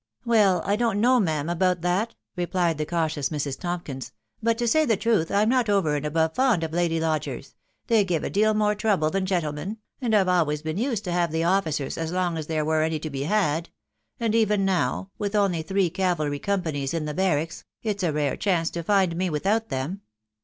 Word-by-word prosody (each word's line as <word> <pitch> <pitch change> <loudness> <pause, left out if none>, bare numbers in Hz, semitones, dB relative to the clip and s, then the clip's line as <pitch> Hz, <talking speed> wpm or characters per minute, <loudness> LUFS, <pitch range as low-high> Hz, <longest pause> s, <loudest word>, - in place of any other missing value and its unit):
<f - - -40
Well.. 210 -6 +3
%. - - -12
I 200 - +3
don't 230 -3 +1
know, 250 +3 +4
ma'am, 155 -7 0
about 180 0 +1
that," 185 +6 0 0.2
replied 175 -3 0
the 150 - -2
cautious 160 -4 -1
Mrs. 145 -3 -3
Tompkins; 170 -7 -5
" - - -48
but, 230 0 +1
to 240 0 -1
say 310 +7 +4
the 225 -8 +2
truth, 210 -6 +1
I'm 205 +2 +3
not 245 -2 +2
over 190 -7 +2
and 145 - -2
above 160 +1 +1
fond 245 -8 +2
of 160 -1 -4
lady 170 -1 +1
lodgers.... 160 -1 -2 0.3
they 225 -3 +4
give 175 -5 -1
a - - -2
deal 215 +2 +3
more 210 0 +2
trouble 200 -7 +1
than 195 -1 -1
gentlemen, 175 +2 -2 0.2
and 230 -4 +1
I've 195 -3 +4
always 155 -5 +1
been 160 +4 -3
used 235 -4 -1
to 180 - -3
have 175 -2 +1
the 160 +1 0
officers 165 -7 0
as 165 0 -2
long 180 -2 0
as 155 -2 -4
there 155 -2 -1
were 155 0 +2
any 160 0 0
to 155 0 -6
be 135 0 -3
had; 165 -4 +1 0.5
and 230 -2 0
even 210 -3 +2
now, 185 0 0
with 205 0 -2
only 195 -5 +2
three 190 +1 0
cavalry 175 -6 0
companies 160 -8 -2
in 160 -2 -2
the 150 - -3
barracks, 165 -2 0 0.2
it's 210 -2 -2
a 175 -3 +1
rare 145 -2 0
chance 175 -5 0
to 170 - -4
find 190 -1 +2
me 185 +1 0
without 200 +9 0
them." 140 +9 -3
180 Hz, 220 wpm, -25 LUFS, 155-205 Hz, 0.5 s, know